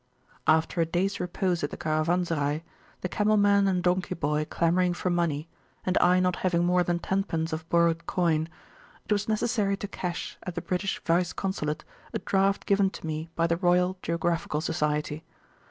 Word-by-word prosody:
After 160 +2 +3
a - - +3
days 185 +4 0
repose 180 -1 -1
at 145 - 0
the - - -7
Caravanserai, 155 -1 0 0.4
the - - -1
camel 210 +3 +2
man 200 -1 +4
and 180 -2 +1
donkey 180 +1 +1
boy 150 -1 0
clamouring 175 +1 +2
for 180 - -1
money, 170 -3 0 0.4
and 185 - 0
I 180 +1 +5
not 180 -1 +1
having 175 -2 +1
more 180 0 +3
than 175 0 +1
tenpence 170 -3 -1
of 160 +1 -5
borrowed 170 -1 +2
coin, 165 -3 +1 0.6
it - - -10
was 205 0 +1
necessary 215 -3 +1
to 205 - -5
cash 180 -3 -5
at 180 - -6
the 175 - -2
British 190 +2 -1
Vice 175 +1 +1
Consulate 155 -6 -3 0.3
a - - +3
draft 195 0 +1
given 200 -1 +3
to 190 - -9
me 155 +1 -4
by 165 - +2
the 170 0 +1
Royal 180 +1 +2
Geographical 170 -2 -1
Society. 150 -1 -1
175 Hz, 175 wpm, -27 LUFS, 165-190 Hz, 0.6 s, I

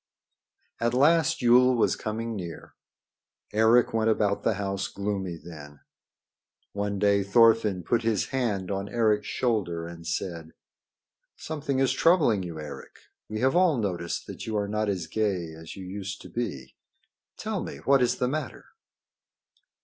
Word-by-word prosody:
At 120 +1 0
last 160 +2 +3
Yule 125 +1 +6
was 115 - +2
coming 115 +1 -4
near. 85 -5 -7 0.8
Eric 110 +3 +4
went 110 0 +2
about 105 -2 +1
the 115 - +1
house 100 -1 -2
gloomy 100 -4 -3
then. 75 -3 -12 0.9
One 100 0 -2
day 100 0 +3
Thorfinn 105 -2 +4
put 115 +6 +1
his 110 -3 0
hand 105 -8 -1
on 100 +1 -3
Eric's 110 -3 +1
shoulder 95 -9 -1
and 85 -1 -9
said: 85 -2 -4 0.8
"Something 145 -3 -3
is 135 -1 +3
troubling 130 - +3
you, 85 -3 -6
Eric. 75 - -9 0.3
We 110 0 -4
have 130 +4 +2
all 175 -5 +4
noticed 90 -6 -3
that - - -8
you 110 -1 -1
are 100 -1 -1
not 105 0 -1 0.2
gay 95 -7 -1
as 80 0 -10
you 95 - -8
used 100 +1 -6
to - - -11
be. 70 - -4 0.6
Tell - - -3
me - - -6
what 135 - +3
is 125 0 +2
the 125 - 0
matter." 145 0 -4
105 Hz, 150 wpm, -27 LUFS, 95-120 Hz, 0.9 s, Yule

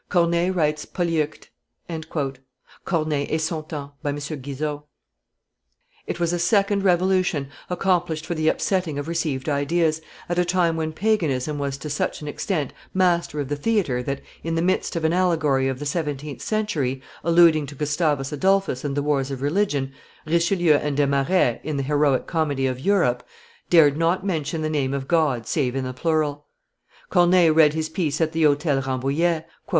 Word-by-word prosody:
Corneille 170 0 +2
writes 155 -4 0
Polyeucte." 165 -4 -2 1.4
[Corneille 155 -5 0
et 160 - 0
son 160 0 -2
Temps, 145 -2 -7
by 145 - -2
M. 140 - -1
Guizot.] 145 0 -5 1.2
It - - -4
was 170 0 +1
a 175 - 0
second 200 +2 +2
revolution 185 -5 +2 0.2
accomplished 175 -3 0
for 170 - -2
the 155 -1 -1
upsetting 175 -3 0
of 145 +1 -4
received 155 -5 -2
ideas, 155 +2 +1 0.3
at 175 0 -1
a - - +4
time 175 -2 +1
when 160 -1 -2
paganism 155 -8 0
was 140 -1 -2
to 150 - -7
such 150 0 -2
an - - -6
extent 150 -1 -2 0.2
master 175 -5 +1
of 140 - -2
the 145 - -2
theatre 145 - 0
that, 140 +2 -4 0.2
in 165 0 -2
the 165 - +1
midst 185 0 0
of 165 -1 -1
an 160 - +2
allegory 160 -7 +2
of 135 -1 -2
the 145 - -6
seventeenth 145 -2 -3
century, 160 -12 -1 0.2
alluding 165 -3 +5
to 145 - -9
Gustavus 150 -1 0
Adolphus 190 -3 +1
and 145 -1 -2
the 145 - 0
wars 140 -2 0
of 135 -1 -5
religion, 145 -4 0 0.3
Richelieu 170 -1 +3
and 145 -1 -2
Desmarets, 140 -1 +2
in 155 -2 -3
the 140 - -1
heroic 145 -1 +2
comedy 145 -5 0
of 130 -1 -1
Europe, 135 -8 +2 0.5
dared 150 -4 +5
not 170 +4 +1
mention 160 -3 -2
the - - 0
name 140 -3 -1
of 135 -1 -4
God 150 -9 +1
save 130 -1 -1
in 135 - -1
the 130 0 -4
plural. 150 0 -1 0.6
Corneille 175 -2 +5
read 155 -1 +5
his 160 -1 -1
piece 160 -3 -2
at 160 -1 +1
the 165 0 -2
Hotel 145 -2 +3
Rambouillet. 140 +6 0
155 Hz, 170 wpm, -23 LUFS, 140-170 Hz, 1.4 s, alluding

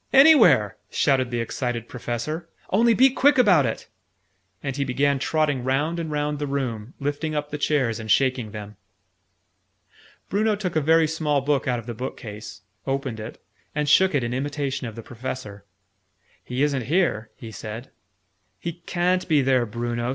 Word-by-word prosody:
"Anywhere!" 225 - +6
shouted 130 -4 +2
the 120 -1 -1
excited 115 0 -3
Professor. 125 +7 -4 0.2
"Only 230 +3 +4
be 265 +3 +6
quick 275 +2 +4
about 185 - +5
it!" 110 - -5 0.8
And 135 -2 -3
he 140 - 0
began 140 +1 +1
trotting 145 -3 0
round 145 +6 0
and 165 -1 -3
round 150 0 -1
the 145 - -2
room, 125 -4 -3
lifting 145 +2 -2
up 150 0 -3
the 150 - -4
chairs, 130 -7 +1
and 110 -1 -7
shaking 130 -2 +2
them. 105 -1 -9 1.5
Bruno 215 +2 +1
took 195 -4 -4
a 155 - +3
very 160 +2 +4
small 150 -3 0
book 145 0 0
out 125 -1 +1
of 115 - -7
the 120 - -5
bookcase, 105 -3 -7 0.3
opened 135 -4 -2
it, 110 +2 -8 0.4
and 150 -1 0
shook 185 +3 +5
it 135 - +1
in 120 +1 -2
imitation 135 -1 -2
of 110 - -8
the 115 - -8
Professor. 115 -4 -7 0.8
"He 125 +3 -1
isn't 140 -5 0
here," 140 - +1
he 115 - -10
said. 110 +4 -8 0.7
"He 170 +5 -6
ca'n't 180 +1 +1
be 150 -5 +3
there, 130 -2 +2
Bruno!" 120 +2 -3
135 Hz, 165 wpm, -24 LUFS, 120-155 Hz, 1.5 s, Anywhere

